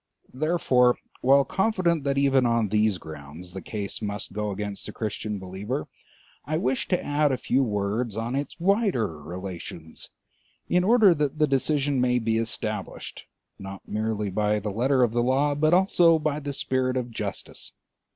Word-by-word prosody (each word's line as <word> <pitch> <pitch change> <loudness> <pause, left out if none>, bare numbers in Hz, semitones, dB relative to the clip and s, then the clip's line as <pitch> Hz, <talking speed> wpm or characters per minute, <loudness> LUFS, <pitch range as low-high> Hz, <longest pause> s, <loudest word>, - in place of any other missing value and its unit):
Therefore, 130 -4 +3 0.2
while 135 +2 +5
confident 185 -7 +1
that 140 0 +1
even 135 -2 +4
on 115 -3 +2
these 105 -1 +2
grounds 80 +3 -10
the 95 - -6
case 100 +4 -4
must 105 -1 -4
go 105 0 -2
against 100 0 -4
the - - -5
Christian 105 -1 -3
believer, 95 +8 -4 0.6
I 155 +1 -1
wish 130 -4 0
to 180 - 0
add 145 0 +2
a 130 - 0
few 130 +1 +1
words 105 0 -1
on 115 +3 -2
its 145 +5 -4
wider 175 - +1
relations, 85 -1 -7 0.6
in 180 0 +2
order 215 -2 +6
that 150 -2 -1
the 155 - +4
decision 140 -1 +1
may 125 0 +3
be 115 -1 +1
established, 110 -1 -4 0.3
not 95 0 -9
merely 105 -1 -2
by 105 +2 +1
the 105 0 -4
letter 130 +5 +2
of 120 - +2
the 120 +1 +1
law, 135 +4 +2
but 155 +2 +2
also 175 -2 +5
by 155 -1 -1
the 145 -1 -4
spirit 130 -1 0
of 125 -1 -3
justice. - - -6
125 Hz, 165 wpm, -26 LUFS, 105-145 Hz, 0.6 s, order